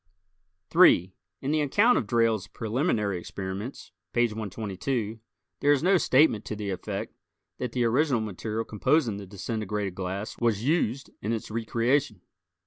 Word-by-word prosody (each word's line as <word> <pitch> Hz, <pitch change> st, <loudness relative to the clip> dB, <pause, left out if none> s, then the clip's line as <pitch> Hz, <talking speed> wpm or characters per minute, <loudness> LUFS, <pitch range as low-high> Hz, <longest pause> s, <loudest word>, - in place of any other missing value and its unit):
3 90 Hz, +2 st, +6 dB, 0.3 s
In 140 Hz, -, -1 dB
the 155 Hz, 0 st, +2 dB
account 205 Hz, -, +4 dB
of 110 Hz, -, 0 dB
Drayle's 115 Hz, -3 st, +2 dB
preliminary 110 Hz, -, -1 dB
experiments 95 Hz, +7 st, -6 dB, 0.2 s
(page 120 Hz, -1 st, +2 dB
122) 110 Hz, +2 st, -3 dB, 0.4 s
there 145 Hz, -, +3 dB
is 145 Hz, 0 st, +3 dB
no 190 Hz, +2 st, +5 dB
statement 130 Hz, -, +4 dB
to 110 Hz, -, -4 dB
the 105 Hz, -1 st, -4 dB
effect 95 Hz, -, -4 dB, 0.5 s
that 125 Hz, -2 st, -3 dB
the 125 Hz, -, +1 dB
original 130 Hz, +2 st, +2 dB
material 110 Hz, +1 st, -3 dB
composing 115 Hz, +1 st, +1 dB
the 100 Hz, -1 st, -8 dB
disintegrated 105 Hz, 0 st, -3 dB
glass 95 Hz, +3 st, -5 dB
was 115 Hz, -3 st, +1 dB
used 135 Hz, -3 st, 0 dB
in 105 Hz, -, -2 dB
its 110 Hz, -1 st, -4 dB
recreation. 115 Hz, 0 st, 0 dB
110 Hz, 140 wpm, -27 LUFS, 100-130 Hz, 0.5 s, 3